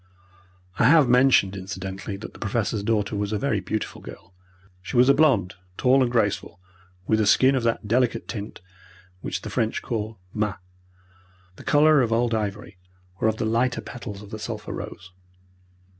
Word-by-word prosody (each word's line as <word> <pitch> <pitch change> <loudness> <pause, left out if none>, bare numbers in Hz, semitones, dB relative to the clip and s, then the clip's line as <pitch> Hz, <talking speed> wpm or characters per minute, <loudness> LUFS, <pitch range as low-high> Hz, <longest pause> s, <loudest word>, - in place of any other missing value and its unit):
I - - +4
have 145 +1 +6
mentioned 125 -6 +4
incidentally 95 +1 -6
that 110 - -9
the - - -14
Professor's 110 0 -1
daughter 105 -1 0
was 100 0 -2
a 105 - 0
very 120 -3 0
beautiful 105 +3 -4
girl. - - -12 0.5
She 95 +7 -4
was 125 +2 +6
a - - +8
blonde, 120 - +3 0.2
tall 130 +1 +4
and 125 -2 +1
graceful, 105 -6 -1 0.5
with 110 +2 +2
a 105 - +1
skin 130 +5 +5
of 130 - +1
that 115 -2 -1
delicate 120 0 +1
tint 105 -4 -7 0.6
which - - -5
the - - -6
French 110 0 -1
call 110 -1 -4 0.2
"mat," 105 -2 -1 1.0
the - - -13
colour 150 0 +5
of 115 -2 0
old 115 +1 +1
ivory, 105 -1 -4 0.4
or - - +2
of 110 0 0
the - - -2
lighter 120 +3 +1
petals 105 -4 -8
of 100 - -13
the 110 - -6
sulphur - - -6
rose. 95 - -8
110 Hz, 175 wpm, -24 LUFS, 100-125 Hz, 1.0 s, a